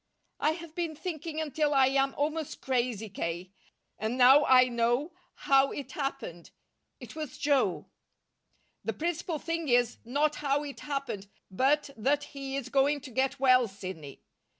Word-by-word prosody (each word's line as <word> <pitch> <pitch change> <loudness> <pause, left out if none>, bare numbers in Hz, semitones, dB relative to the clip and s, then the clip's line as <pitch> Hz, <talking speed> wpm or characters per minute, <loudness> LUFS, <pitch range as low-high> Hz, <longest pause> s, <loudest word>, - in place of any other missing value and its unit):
"I 305 - +2
have 330 -1 -10
been 330 -2 -3
thinking 320 -1 -5
until 300 -1 0
I 270 -1 +6
am 270 0 +1
almost 305 +1 -2
crazy, 240 -4 -1
K. 180 -1 -4 0.5
And 220 +4 -2
now 265 +3 +7
I 255 -1 +6
know 240 +6 0 0.3
how 275 0 +4
it 285 - -6
happened. 270 - -5 0.5
It - - -11
was 305 -5 -6
Joe." 275 -10 +1 1.0
"The 225 - -2
principal 335 - -2
thing 330 0 -3
is, 245 -1 +2
not 290 +6 0
how 285 0 0
it 285 -2 -7
happened, 270 -9 -4 0.2
but 275 +8 +1
that 280 +6 +1
he 275 -1 -5
is 265 -2 -4
going 280 +2 +2
to 265 -1 -10
get 265 +3 0
well, 255 -2 +5
Sidney." 185 -8 -9
275 Hz, 150 wpm, -29 LUFS, 240-295 Hz, 1.0 s, now